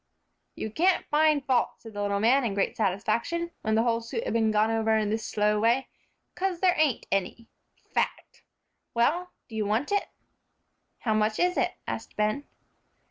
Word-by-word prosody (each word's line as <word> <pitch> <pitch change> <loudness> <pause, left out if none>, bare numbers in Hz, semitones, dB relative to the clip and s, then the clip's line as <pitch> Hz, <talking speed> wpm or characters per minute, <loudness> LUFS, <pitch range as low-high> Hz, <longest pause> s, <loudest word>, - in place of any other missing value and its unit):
"You 220 - -4
can't 360 - +2
find 300 -2 +3
fault," 255 -3 +2
said 225 -1 -12
the 205 - -4
little 200 0 0
man, 250 +6 +4
in 215 -5 -1
great 200 - 0
satisfaction, 235 - -1
when 220 -1 0
the 225 - +3
whole 230 -1 +1
suit 455 - -4
had - - -2
been 225 -1 +2
gone 215 +1 +2
over 220 0 +2
in 210 -1 0
this 220 0 -1
slow 210 0 +1
way, 235 +5 +2 0.4
"'cause 370 -2 -2
there 365 -1 +4
ain't 300 -6 +1
any. 195 +4 -1 0.5
Fact! - - -2 0.5
Well, 335 +10 +2 0.2
do 225 - -10
you 215 -2 -1
want 225 - 0
it?" 405 -1 +1 0.9
"How 220 - +1
much 215 0 +1
is 360 +1 +2
it?" - - +1
asked - - -5
Ben. 215 +7 0
230 Hz, 180 wpm, -27 LUFS, 215-295 Hz, 0.9 s, man